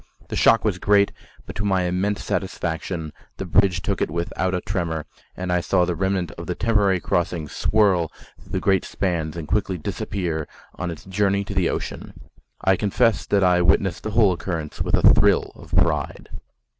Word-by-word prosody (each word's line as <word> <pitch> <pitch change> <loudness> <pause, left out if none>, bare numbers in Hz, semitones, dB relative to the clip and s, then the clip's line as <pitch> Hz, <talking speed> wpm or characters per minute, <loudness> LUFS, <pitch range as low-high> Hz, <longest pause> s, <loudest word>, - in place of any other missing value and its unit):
The - - -3
shock 115 - +4
was 95 -5 0
great, 100 0 +3 0.3
but - - -9
to 105 - -2
my 95 -3 +1
immense 95 +3 -1
satisfaction 85 -3 -3 0.2
the 95 - -4
bridge 90 0 +2
took 100 -2 -2
it - - +1
without 85 +2 -2
a 90 - -2
tremor, 85 -5 -2 0.3
and 90 0 -3
I 90 - +2
saw 90 0 +2
the 90 - -1
remnant 95 -1 -1
of 85 - -7
the 90 - -2
temporary 105 -4 +2
crossings 85 -4 -1
swirl 95 -6 +2 0.3
through - - -15
the - - +1
great 95 -1 +2
spans 85 -4 -2
and 80 -3 -5
quickly 95 +1 0
disappear 80 -1 -3 0.3
on 90 - -4
its 85 - -8
journey 100 +1 +1
to - - -6
the - - +1
ocean. - - -5 0.4
I 95 -1 +3
confess 110 +2 +1
that 100 -1 +2
I 90 -1 +4
witnessed 90 +1 +2
the 110 - -4
whole 105 -5 +5
occurrence 85 -4 -5
with - - +2
a - - +4
thrill - - +3
of - - -14
pride. - - 0
90 Hz, 185 wpm, -23 LUFS, 85-100 Hz, 0.4 s, whole